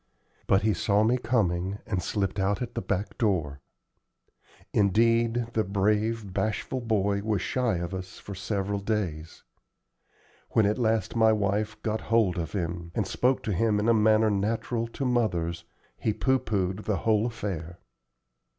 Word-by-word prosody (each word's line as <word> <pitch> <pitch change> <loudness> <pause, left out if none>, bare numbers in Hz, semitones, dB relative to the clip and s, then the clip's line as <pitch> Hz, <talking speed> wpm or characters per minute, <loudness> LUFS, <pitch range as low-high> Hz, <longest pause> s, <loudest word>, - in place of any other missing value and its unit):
But 95 +1 +3
he 110 0 +3
saw 105 +1 +2
me 120 +3 +2
coming, 100 -6 0
and 95 -4 -1
slipped 100 0 -2
out 100 +3 +1
at 120 -2 -4
the 115 - -3
back 100 +2 -3
door. 80 - 0 1.1
Indeed, 115 +3 +2
the 110 - +2
brave, 105 +1 0
bashful 110 +5 -2
boy 100 -3 +1
was 105 0 -1
shy 125 -7 0
of 85 +2 -4
us 95 0 -6
for 100 - -8
several 100 +1 -2
days. 95 -7 -3 1.1
When 110 - +4
at 105 +4 +1
last 110 -4 0
my 110 -1 +5
wife 105 +1 0
got 110 0 -1
hold 105 -6 +2
of 80 -2 -4
him, 85 -3 -3
and 105 - 0
spoke 130 +6 +1
to 105 - -1
him 105 +2 +2
in 105 - 0
a 115 - +5
manner 110 0 +4
natural 115 +3 -1
to 135 +4 -4
mothers, 90 -9 0 0.3
he 110 - 0
pooh 130 +3 +2
poohed 95 -2 -2
the 105 -3 0
whole 110 0 +3
affair. 90 -7 -5
105 Hz, 160 wpm, -27 LUFS, 95-115 Hz, 1.1 s, my